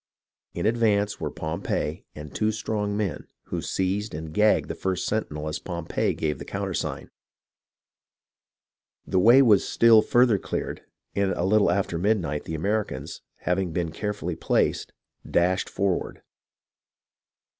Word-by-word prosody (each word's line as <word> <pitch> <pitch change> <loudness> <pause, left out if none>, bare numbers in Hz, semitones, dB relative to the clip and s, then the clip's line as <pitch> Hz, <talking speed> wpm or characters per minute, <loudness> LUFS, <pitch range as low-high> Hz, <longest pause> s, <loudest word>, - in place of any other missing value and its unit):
In 85 - -2
ad 115 +2 +2
vance 105 -3 +1
were - - -1
Pompey 80 +1 -3
and 75 -1 -9
two 110 0 +1
strong 105 -2 -2
men, 105 -4 -3 0.2
who - - -2
seized 95 +1 -2
and 80 0 -6
gagged 105 +3 +3
the - - -3
first 95 -1 -2
sentinel 80 -8 -2
as 75 - -3
Pompey 85 -3 -2
gave 75 -4 -2
the - - -6
countersign. - - -4 1.9
The 95 - +1
way 120 +8 +7
was 105 -6 +5
still 115 -2 +6
further 120 -5 +3
cleared, - - -4 0.3
and 100 -1 +1
a - - -2
little 105 +2 +4
after 95 -4 0
midnight 90 -7 0
the 80 - -4
Americans, 100 -6 -2 0.2
having 90 -1 0
been 85 -2 -1
carefully 100 -2 -3
placed, - - 0 0.4
dashed 90 +2 +2
for 100 -1 +1
ward. - - -6
95 Hz, 140 wpm, -25 LUFS, 85-105 Hz, 1.9 s, way